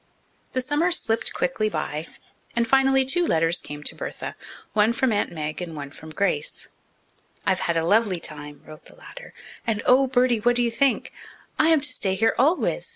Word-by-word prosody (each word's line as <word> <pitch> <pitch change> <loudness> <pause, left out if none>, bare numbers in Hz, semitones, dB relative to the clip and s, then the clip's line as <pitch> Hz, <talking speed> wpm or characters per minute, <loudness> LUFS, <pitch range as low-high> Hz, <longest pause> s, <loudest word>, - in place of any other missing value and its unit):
The 255 - 0
summer 290 +7 +1
slipped 230 -10 0
quickly 215 +5 -1
by, 155 -5 -3 0.5
and 235 0 +1
finally 270 +1 +4
two 350 +7 +2
letters 165 - +2
came 145 0 -8
to - - 0
Bertha, - - -6 0.4
one 215 +2 +3
from 255 +1 +1
Aunt 205 - 0
Meg 155 0 -4
and 170 -2 -6
one 140 -1 -7
from 160 - -12
Grace. 155 -3 -1 0.8
"I've 190 -2 +2
had 170 - +2
a 165 - +1
lovely 205 -1 +2
time," 145 -2 -6
wrote 155 -1 -13
the - - -16
latter, - - -12 0.4
"and, 215 -2 -1
oh, 265 +2 +5
Bertie, 250 -2 +2
what 245 +3 +2
do 245 - +2
you 235 - 0
think? 265 +3 +1 0.5
I - - +5
am 320 -3 +4
to 295 - 0
stay 190 -8 -1
here 225 +4 +2
always. 325 - +1
220 Hz, 190 wpm, -24 LUFS, 165-260 Hz, 0.8 s, oh